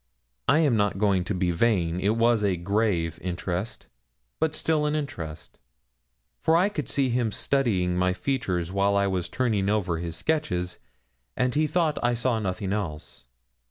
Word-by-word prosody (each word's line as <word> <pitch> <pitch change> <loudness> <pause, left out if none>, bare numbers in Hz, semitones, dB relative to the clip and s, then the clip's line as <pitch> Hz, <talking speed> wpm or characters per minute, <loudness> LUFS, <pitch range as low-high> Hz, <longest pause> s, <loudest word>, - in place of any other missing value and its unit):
I - - +5
am 145 -7 +3
not 105 -3 +1
going 100 -3 +2
to 100 - -2
be 90 -1 +1
vain. 85 -3 +1
It 105 +4 +1
was 115 -2 +3
a 95 -3 +1
grave 90 -3 0
interest, 90 +3 -3 0.5
but 160 -1 +1
still 155 -1 +1
an 150 - 0
interest, 85 - -6 0.8
for 160 +1 +3
I 185 +4 +3
could 155 -8 -4
see 135 -2 +1
him 120 -2 0
studying 100 -10 0
my 90 +1 +2
features 90 -5 -2
while 100 +1 +2
I 100 - +3
was 90 -3 -1
turning 110 -6 0
over 95 -6 0
his 85 -1 -4
sketches, 90 - -1 0.6
and 125 0 +1
he 155 +3 +2
thought 155 -1 +1
I 120 0 +2
saw 120 -1 0
nothing 95 -1 -2
else. 75 - -5
105 Hz, 165 wpm, -26 LUFS, 90-125 Hz, 0.8 s, I